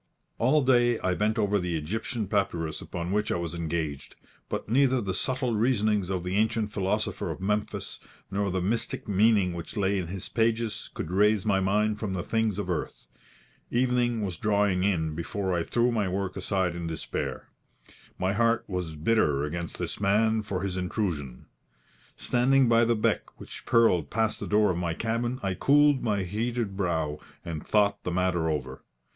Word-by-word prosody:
All 140 +5 +3
day 120 -2 +4
I 95 - +1
bent 105 +4 0
over 105 -1 +2
the 90 -2 -1
Egyptian 110 +7 -3
papyrus 85 -6 -1
upon 85 0 -5
which 105 +1 0
I - - +1
was 85 -1 -3
engaged; 80 -4 -3 0.3
but - - -3
neither 130 +3 +3
the 95 -5 -2
subtle 130 +3 -1
reasonings 105 -4 +1
of 95 -2 -2
the 90 +2 -1
ancient 110 0 +1
philosopher 105 +2 -1
of - - -5
Memphis, 105 +2 -2 0.3
nor 100 0 0
the 90 -1 -1
mystic 110 +5 -1
meaning 100 -2 +3
which 85 +6 -7
lay 100 0 +1
in 90 - -4
his 95 +1 -6
pages, 115 -1 0
could 80 - -4
raise 105 +1 +3
my 100 -3 +3
mind 105 +2 +1
from 105 -4 -3
the 90 -2 -2
things 110 -2 0
of 105 - -3
earth. 90 -7 -4 0.6
Evening 120 -2 +1
was 90 -5 -3
drawing 100 -3 +1
in 80 -6 +1
before 95 +4 -2
I 85 - +1
threw 120 +6 +1
my 105 -4 0
work 95 0 -2
aside 95 -4 -1
in 85 -1 -4
despair. 80 -1 -4 0.7
My 95 +1 0
heart 115 +2 +2
was 90 -4 -4
bitter 75 -4 +2
against 85 +3 -4
this - - -4
man 110 +2 +3
for 100 -3 -3
his 95 -2 -2
intrusion. 90 - -3 0.7
Standing 130 +1 +3
by 115 0 +5
the 115 0 +2
beck 110 - -1
which - - -9
purled 90 -10 +3
past 110 0 0
the - - -5
door 105 -1 +3
of 85 - -2
my 85 -2 -2
cabin, 120 +4 -2
I 95 -1 0
cooled 145 +5 +4
my 105 -4 0
heated 110 +2 -2
brow, 80 -6 -1 0.3
and 80 -3 -5
thought 100 -1 +2
the - - -2
matter 90 -2 +1
over. 65 -4 -3
100 Hz, 175 wpm, -27 LUFS, 90-115 Hz, 0.7 s, by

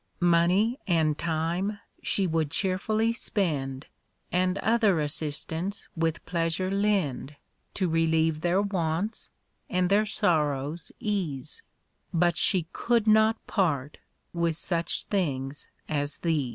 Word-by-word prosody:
Money 190 - +3
and 160 -4 +2
time 170 +6 -1 0.2
she 195 - +1
would 160 -3 0
cheerfully 215 +6 0
spend, 145 - -2 0.5
And 185 +1 +1
other 220 -5 +3
assistance 155 +5 -2
with 165 -1 -1
pleasure 170 +2 -1
lend 195 -9 0 0.4
To 185 - +1
relieve 160 -1 +2
their 175 +4 +2
wants 185 +1 -2 0.4
and 180 -4 +1
their 210 +2 +4
sorrows 155 -6 0
ease 175 - -3 0.5
But 175 0 +2
she 185 -1 +3
C(nild 235 -2 +1
not 220 +1 +4
part 150 -8 0 0.3
with 170 -2 0
such 170 -1 -1
things 140 -8 -2 0.2
as 145 -1 -2
these. 155 -6 0
170 Hz, 110 wpm, -27 LUFS, 155-200 Hz, 0.5 s, their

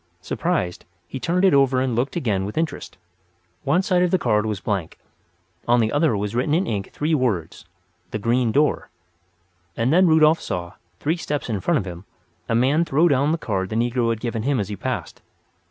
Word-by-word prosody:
Surprised, 125 - -2 0.2
he 135 - -6
turned 175 +9 +1
it 190 - +5
over 135 -2 +4
and 130 -2 0
looked 130 +4 -1
again 105 - 0
with 105 +7 -6
interest. 160 -9 -3 0.7
One 155 +7 +2
side 180 -2 +2
of 180 - +3
the 185 - +3
card 110 -7 +1
was 105 -3 -2
blank; 95 -5 -3 0.7
on 120 +1 +4
the 110 -1 +1
other 145 -6 +2
was 105 +1 -3
written 130 +5 +1
in 185 +4 +1
ink 100 - -3
three 155 +2 -1
words, 115 - -1 0.4
"The - - -3
Green 115 +2 +1
Door." 145 +5 +1 0.9
And 120 +5 +1
then 185 +2 +5
Rudolf 160 0 +5
saw, 85 -1 -4 0.3
three 160 +4 0
steps 145 -5 -3
in 105 - -1
front - - +2
of 100 - -2
him, 90 +1 -8 0.4
a 115 - +1
man 135 +7 +3
throw 160 +1 +3
down 140 +1 +2
the 165 - +1
card 95 - -2
the 110 - -4
negro 120 +1 +1
had 115 -1 -1
given 115 -1 -3
him 135 +2 0
as 100 -1 -3
he 105 - -4
passed. - - -5
125 Hz, 200 wpm, -22 LUFS, 105-155 Hz, 0.9 s, it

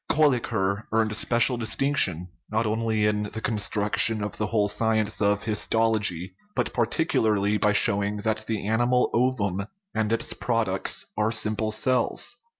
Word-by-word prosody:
Kolliker 115 -9 +1
earned 110 -1 +1
special 120 +3 +2
distinction, 110 - +1 0.2
not 110 +1 0
only 110 0 0
in 105 0 +1
the 110 - -4
construction 105 0 +1
of 105 - -4
the 110 - -1
whole 105 -1 +1
science 110 +1 0
of 105 0 +1
histology, 105 -4 0 0.2
but - - -1
particularly 110 -5 +1
by 105 0 +2
showing 100 0 0
that 110 0 -2
the 110 -2 -3
ani 110 +2 +1
mal 125 0 +2
ovum 105 -6 0 0.3
and 110 -1 -1
its 115 0 0
products 110 -6 -1
are 105 +1 0
simple 110 -1 +1
cells. 125 +2 0
110 Hz, 145 wpm, -25 LUFS, 105-115 Hz, 0.3 s, special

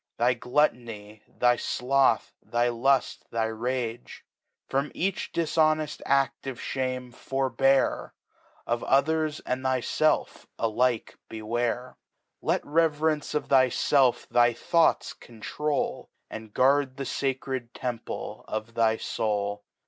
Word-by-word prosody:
Thy 120 +2 +3
Gluttonj, 120 -5 -1
thy 120 0 +2
Sloth,^ 130 -1 +1
thy 120 +1 0
Lull, 130 +3 +3 0.3
thy 115 -1 0
Rager 120 +1 -3 0.6
From 140 +2 -1
each 190 +2 -2
difiioneft 155 -2 +1
Ad 135 0 +3
of 130 -3 -5
Shame 130 -1 -3
forbear; 135 +1 +1 0.5
Of 120 0 -1
others, 155 +3 +2
and 130 +1 -3
thyielf, 130 +4 0
alike 115 +1 0
beware. 120 +3 -3 0.4
Xet - - +1
Reverence 155 -1 +1
of 150 - -2
thyfelf 130 0 +3
thy 120 0 +4
Thoughts 170 +7 +2
control^ 145 +6 -3 0.2
And 110 -1 -8
guard 135 +2 +2
the 140 - -3
facred 130 -2 -2
Temple 120 -2 -5
of 110 +2 -4
thy 115 -1 +2
Soul. 105 -2 -2
130 Hz, 110 wpm, -27 LUFS, 115-140 Hz, 0.6 s, thy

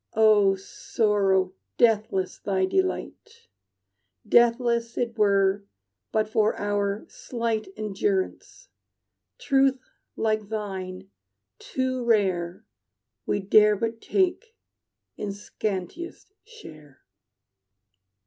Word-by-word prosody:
"O 210 -3 +5
Sorrow, 195 -1 0 0.2
deathless 210 -5 +1
thy 190 -2 0
delight! 440 - -3 0.8
Deathless 235 0 +3
it 235 -1 -1
were 200 -2 +2 0.5
but 215 -1 +1
for 215 0 +1
our 205 0 -1
slight 230 -3 -3
Endurance! 375 - -2 0.7
Truth 270 - +2 0.4
like 215 -2 -1
thine, 190 -3 -5 0.5
too 260 - -2
rare, 190 -6 0 0.6
We 205 - 0
dare 210 +2 +5
but 225 +2 -3
take 405 +4 0 0.6
in 210 - -4
scantiest 210 - -5
share." 155 - -14
215 Hz, 80 wpm, -25 LUFS, 195-240 Hz, 0.8 s, O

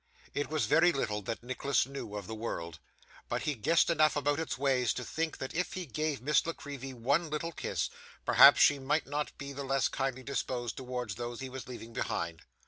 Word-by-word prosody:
It 145 - -2
was 155 -1 +1
very 175 +2 +5
little 105 -8 -1
that 115 +4 -5
Nicholas 130 +1 +1
knew 135 -6 -7
of 100 -2 -5
the 110 - -6
world, 85 -8 -5 0.5
but - - -1
he 150 - 0
guessed 145 +8 +3
enough 155 -2 +4
about 145 +1 +1
its 160 - -2
ways 130 -3 +2
to 125 - -3
think, 160 +4 -2
that 130 - -5
if 180 +2 -1
he 185 -1 -4
gave 155 -2 -2
Miss 150 +2 +3
La 165 - -1
Creevy 140 -3 -7
one 140 +7 +1
little 155 +2 -2
kiss, - - -2 0.3
perhaps - - +8
she 145 -1 +6
might 145 +4 +1
not 145 +1 -3
be 140 0 -6
the 140 +1 -5
less 135 0 +1
kindly 130 -1 -2
disposed 125 -3 -2
towards 125 -4 -4
those 120 +1 -5
he 130 - -5
was 130 0 -7
leaving 115 -2 -8
behind. 85 -6 -2
135 Hz, 210 wpm, -31 LUFS, 120-150 Hz, 0.5 s, perhaps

